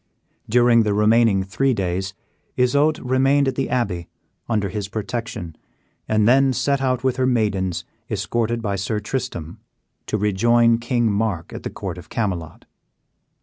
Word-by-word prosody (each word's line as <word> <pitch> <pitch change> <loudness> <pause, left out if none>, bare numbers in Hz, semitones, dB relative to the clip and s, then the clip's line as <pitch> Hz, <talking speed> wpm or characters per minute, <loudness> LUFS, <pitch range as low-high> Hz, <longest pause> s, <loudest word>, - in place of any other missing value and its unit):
During 120 0 +5
the 105 -2 +1
remaining 105 -2 +4
three 125 +7 0
days, 95 0 -2 0.4
Isoude 145 +5 +3
remained 135 +2 +3
at 135 - +1
the 135 - -2
abbey, 95 -9 -1 0.4
under 105 -4 0
his 100 +1 -4
protection, 105 -5 -5 0.5
and 110 -1 +2
then 135 +2 +4
set 140 +2 0
out 130 -1 0
with 130 -1 +1
her 130 -1 +2
maidens, 100 -7 0 0.2
escorted 115 0 -1
by 100 -2 -1
Sir 105 +3 -2
Tristram, 105 - -5 0.5
to 110 - 0
rejoin 115 +3 +3
King 120 -2 +1
Mark 100 -5 -2
at - - -6
the - - -4
court - - -6
of - - -14
Camelot. 90 -8 -3
115 Hz, 145 wpm, -22 LUFS, 100-125 Hz, 0.5 s, During